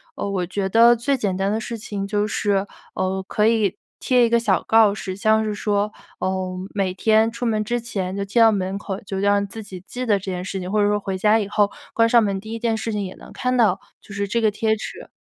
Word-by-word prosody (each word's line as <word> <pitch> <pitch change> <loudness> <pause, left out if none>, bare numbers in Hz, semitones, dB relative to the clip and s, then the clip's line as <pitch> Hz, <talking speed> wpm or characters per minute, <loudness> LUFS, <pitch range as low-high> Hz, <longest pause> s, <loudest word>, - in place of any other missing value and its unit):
呃， 200 - -3
我 185 -3 -1
觉 190 +2 -2
得 235 +3 +6
最 270 +4 0
简 200 -5 -1
单 195 +2 0
的 220 - 0
事 230 +1 -5
情 200 -2 -5
就 205 0 0
是， 200 -1 0 0.3
呃， 190 0 -2
可 210 - +1
以 220 -4 +1 0.2
贴 250 -2 +3
一 230 - 0
个 235 0 +3
小 195 -6 +1
告 220 -2 +5
示， 190 -2 -5
像 220 +2 +2
是 215 -1 -2
说， 205 0 0 0.3
呃， 185 -1 -2 0.2
每 195 -3 -1
天 220 +3 +3
出 235 +1 -5
门 215 -2 +1
之 240 +3 -1
前 195 -5 -4
就 200 - -2
贴 215 +4 +2
到 225 -1 +7
门 195 -1 -2
口， 195 -1 -5
就 195 -1 -5
让 200 0 +2
自 220 +3 -7
己 190 -3 -9
记 250 +3 -5
得 210 -3 +3
这 195 - -9
件 180 0 -4
事 190 +1 -4
情， 180 +1 -5
或 210 -1 +2
者 205 - +3
说 205 0 +1
回 195 -1 -4
家 210 +3 +4
以 205 - -2
后， 205 0 +2 0.2
关 230 0 +4
上 235 -1 +6
门 195 -2 -1
第 220 +2 -10
1 - - -3
件 230 -1 0
事 225 +2 -3
情 210 -1 -2
也 185 - -7
能 - - -14
看 255 0 -1
到 210 -6 +3 0.2
就 205 - -12
是 200 0 -1
这 230 +3 0
个 220 - +4
贴 220 +1 +1
纸。 215 - -8
205 Hz, 275 characters per minute, -22 LUFS, 195-225 Hz, 0.3 s, 到